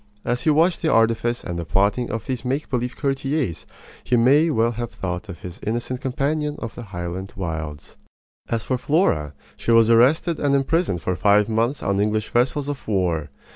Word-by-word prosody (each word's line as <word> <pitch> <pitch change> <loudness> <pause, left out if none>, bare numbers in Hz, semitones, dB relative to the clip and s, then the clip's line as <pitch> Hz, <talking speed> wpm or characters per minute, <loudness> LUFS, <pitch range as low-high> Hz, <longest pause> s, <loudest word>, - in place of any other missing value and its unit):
As 120 - 0
he - - +1
watched 165 +3 +3
the 160 - +1
artifice 115 +1 +2
and 85 -1 -4
the - - -3
plotting 100 +8 +1
of 115 - -4
these 125 -3 -3
make 135 +4 -2
believe 125 -1 -1
courtiers 135 - -2 0.4
he 125 - +2
may 140 +8 +5
well 115 -4 +2
have 120 0 -4
thought 90 +3 -5
of 90 - -8
his 90 0 -8
innocent 120 +3 -3
companion 145 +3 -1
of 115 -3 -6
the - - -8
Highland 95 -2 -6
wilds. 80 -5 -5 0.5
As 115 -2 -1
for 130 -2 -1
Flora, 85 - +1 0.2
she - - -5
was 115 0 +6
arrested 145 +8 +4
and 140 -1 +2
imprisoned 135 - 0
for 90 - 0
five 105 +2 +4
months 115 +5 0
on 100 0 0
English 110 +1 0
vessels 130 +4 +1
of 145 -2 -5
war. 90 -7 0
115 Hz, 185 wpm, -22 LUFS, 95-135 Hz, 0.5 s, was